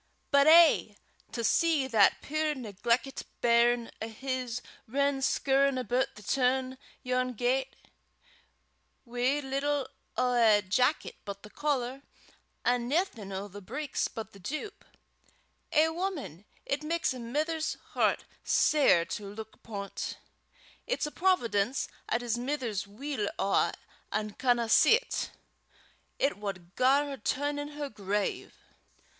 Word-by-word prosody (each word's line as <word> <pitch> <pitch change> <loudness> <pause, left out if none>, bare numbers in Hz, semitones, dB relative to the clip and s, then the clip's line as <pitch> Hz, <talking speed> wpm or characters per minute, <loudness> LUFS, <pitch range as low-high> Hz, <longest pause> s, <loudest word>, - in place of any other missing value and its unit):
But 280 0 +5
eh! 320 -10 +7 0.4
to 235 - -3
see 315 +2 +3
that 220 -6 +4
puir 310 +1 0
negleckit 235 +3 -1 0.2
bairn 235 0 +3
o' 220 - -2
his 250 +1 -4 0.2
rin 280 +3 +1
scoorin' 275 0 +2
aboot 255 +2 0
the 210 - -12
toon 260 +2 +1 0.2
yon 255 0 0
gait 255 +3 0 1.3
wi' 250 +4 0
little 275 +1 -1 0.3
o' 250 0 +2
a 220 -4 +5
jacket 250 +10 +1
but 200 -1 -7
the 210 - -12
collar, 270 -3 -1 0.6
an' 245 -1 +2
naething 265 - -1
o' 195 +1 -4
the 205 +1 -10
breeks 270 +9 -2
but 220 -1 -7
the 200 - -15
doup 310 - -5 0.9
eh, 315 0 +5
wuman! 320 - -4 0.2
it 280 +1 -1
maks 325 -1 0
a 255 - -7
mither's 305 +7 -2 0.2
hert - - +2 0.2
sair 275 - +4
to 200 +2 -6
luik 220 0 -8
upo' 200 -3 -7
't. - - -5 0.7
It's - - 0
a 300 - -4
providence 255 - +1 0.2
'at 235 - +1
his 240 -1 -1
mither's 245 -7 -2
weel 220 0 -3
awa 195 - +2 0.4
an' 215 0 -1
canna 240 -1 +1
see 450 - +6
't; - - -4 0.9
it 275 -4 +1
wad 185 -4 -6
gar 270 +3 +4
her 280 -1 -5
turn 285 +6 -1
in 290 - -4
her 290 -1 -2
grave." 205 -1 -2
255 Hz, 135 wpm, -30 LUFS, 220-285 Hz, 1.3 s, eh